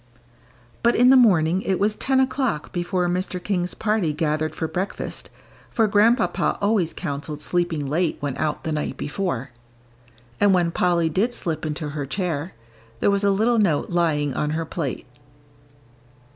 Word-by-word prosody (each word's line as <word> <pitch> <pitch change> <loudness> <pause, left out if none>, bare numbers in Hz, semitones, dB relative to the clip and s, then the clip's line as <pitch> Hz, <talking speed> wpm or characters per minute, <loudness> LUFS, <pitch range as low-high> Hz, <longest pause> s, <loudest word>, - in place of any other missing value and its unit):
But 235 0 +3
in 250 +2 +6
the - - +7
morning, 185 -8 +4
it 190 -2 -1
was 210 +1 +2
ten 265 +4 +1
o'clock 260 - 0
before 180 0 -1
Mr. 180 +1 -2
King's 180 -3 -1
party 210 -8 0
gathered 155 0 -1
for 160 - -2
breakfast, 185 +5 -5 0.4
for 225 - +2
Grandpapa 220 +3 +2
always 200 -5 +1
counselled 150 -2 -5
sleeping 170 -2 -1
late 160 +4 0
when 145 -3 -3
out 150 -1 -2
the 160 - -3
night 150 -1 -2
before. 145 -6 -3 0.9
And 200 -2 +5
when 175 -2 +2
Polly 170 -1 +2
did 210 +10 0
slip 160 -2 -3
into 150 0 -3
her 145 -1 -4
chair, 175 -1 -3 0.4
there 200 - +3
was 200 0 +1
a 200 - +4
little 220 +4 +2
note 175 -8 +1
lying 155 -5 +1
on 150 - -1
her 165 - -2
plate. 155 -5 -4
175 Hz, 160 wpm, -23 LUFS, 155-205 Hz, 0.9 s, the